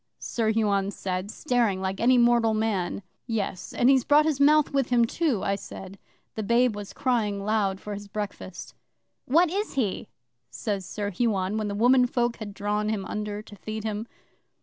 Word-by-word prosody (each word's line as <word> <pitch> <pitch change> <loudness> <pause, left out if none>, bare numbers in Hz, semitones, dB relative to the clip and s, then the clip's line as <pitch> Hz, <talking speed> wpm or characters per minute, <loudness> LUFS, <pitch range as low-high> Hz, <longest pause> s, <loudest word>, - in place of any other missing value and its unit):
Sir 225 -2 -1
Huon 200 -3 +1
said, 185 -1 -4
staring 235 -6 0
like 190 0 -3
any 250 +2 +4
mortal 235 -2 +4
man. 205 -4 -1 0.2
'"Yes, 205 -5 -3
and 245 - +2
he's 265 -2 +5
brought 295 +3 +5
his 305 -4 0
mouth 300 +1 +4
with 275 -3 +1
him, 240 -2 +4
too," 265 - 0
I 195 - +1
said. 195 -1 -8 0.3
The 220 - -4
babe 235 +2 +2
was 205 -1 -7
crying 220 -7 -1
loud 205 -3 +1
for 210 - -6
his 205 0 -7
breakfast. 200 -3 -6 0.5
'"What 330 +5 +3
is 410 +3 -2
he?" 220 -8 -1 0.4
says 200 -4 -3
Sir 205 -1 -3
Huon, 200 -2 0
when 215 - -2
the 200 - -3
womenfolk 245 +1 +3
had 205 -3 -7
drawn 210 +1 -1
him 205 -3 -2
under 210 0 -4
to 215 -1 -13
feed 215 +2 -6
him. 215 +1 -3
215 Hz, 175 wpm, -26 LUFS, 200-245 Hz, 0.5 s, he's